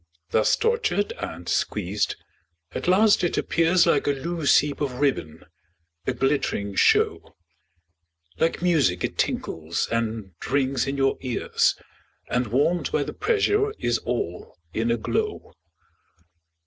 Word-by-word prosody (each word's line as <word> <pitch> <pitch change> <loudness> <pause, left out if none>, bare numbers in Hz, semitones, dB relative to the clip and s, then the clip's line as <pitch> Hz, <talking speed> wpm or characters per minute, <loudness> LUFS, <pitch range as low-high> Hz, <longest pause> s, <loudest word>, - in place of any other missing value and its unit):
Thus 110 - +3
tortured 455 - 0
and 90 -4 -6
squeezed, 105 0 -1 0.6
at - - -5
last 205 +3 +4
it 175 - 0
appears 170 +2 +3
Like - - +2
a 145 - +3
loose 160 +2 +2
heap 145 0 0
of 140 -3 -1
ribbon, 130 - -1 0.6
a - - +1
glittering 135 -7 -1
show, - - +2 1.0
Like 165 +1 0
music 145 - +2
it - - -3
tinkles 80 +1 -1
and 110 -4 -2 0.2
rings 135 -2 +1
in 140 +1 -2
your 135 0 +1
ears, 125 -3 +1 0.6
And 125 -1 +1
warm'd 145 +10 +1
by 460 - +1
the - - -6
pressure 425 -2 +1
is 120 0 0
all 105 -8 -4 0.2
in 115 +1 0
a 115 - +2
glow. 110 - -3
135 Hz, 130 wpm, -24 LUFS, 110-170 Hz, 1.0 s, last